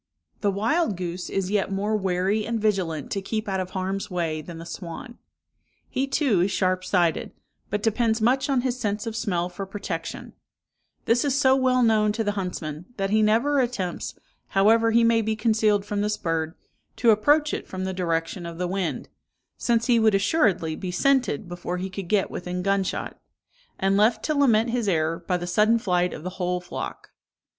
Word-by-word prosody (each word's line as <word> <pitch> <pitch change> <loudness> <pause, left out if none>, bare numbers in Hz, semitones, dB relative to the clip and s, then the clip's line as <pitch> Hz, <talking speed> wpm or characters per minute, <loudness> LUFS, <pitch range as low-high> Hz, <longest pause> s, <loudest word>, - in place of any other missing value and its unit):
"The 205 - +1
wild 220 - +1
goose 180 0 -4
is 195 -1 -2
yet 205 -2 0
more 205 +3 0
wary 190 +2 0
and 230 +1 -2
vigilant 185 -9 -1
to 195 - -1
keep 215 +2 -3
out 190 -1 -1
of 185 -1 -3
harm's 190 +1 -2
way 165 -4 -2
than 165 +2 -9
the 165 - -8
swan. 175 +7 -8 0.7
He 270 +1 -1
too 270 - +2
is 185 - +2
sharp 185 -1 0
sighted, 175 -4 +1 0.4
but 205 0 -2
depends 225 0 +1
much 260 +5 +2
on 265 -3 +2
his 250 0 -2
sense 210 -1 -2
of 225 -1 -4
smell 185 -7 -1
for 190 +2 -7
protection: 185 -4 -5 0.7
this 235 +1 +3
is 280 -1 +1
so 265 -2 +5
well 255 -1 +3
known 215 -2 +3
to 225 +1 -1
the 205 - 0
huntsman, 180 -5 -4
that 195 0 -1
he 215 0 +4
never 235 +7 +3
attempts, 220 -9 -2 0.3
however 225 +4 +4
he 230 +1 +4
may 230 0 +4
be 220 0 -1
concealed 215 -2 +2
from 205 0 -2
this 210 0 0
bird, 165 -1 -2 0.4
to 235 - +4
approach 290 +8 +3
it - - -4
from 185 0 -5
the 190 0 -2
direction 170 0 -2
of 170 -1 -8
the 180 0 -1
wind; 185 -2 -2 0.5
since 230 -1 +1
he 240 -2 +4
would 220 -2 +4
assuredly 195 - +2
be 185 - -5
scented 250 - +1
before 175 0 -4
he 185 +1 -4
could 190 -1 -6
get 205 0 +1
within 180 0 -4
gun 195 0 +2
shot, - - -5 0.6
and 195 +1 +2
left 220 +1 +3
to 310 - +1
lament 235 -5 +3
his 235 -3 -1
error, 165 -2 +1
by 180 - +1
the 175 - -5
sudden 210 +6 +3
flight 180 -5 +1
of 155 - -8
the 185 - -4
whole 180 0 0
flock. 180 - -7
200 Hz, 195 wpm, -25 LUFS, 180-225 Hz, 0.7 s, so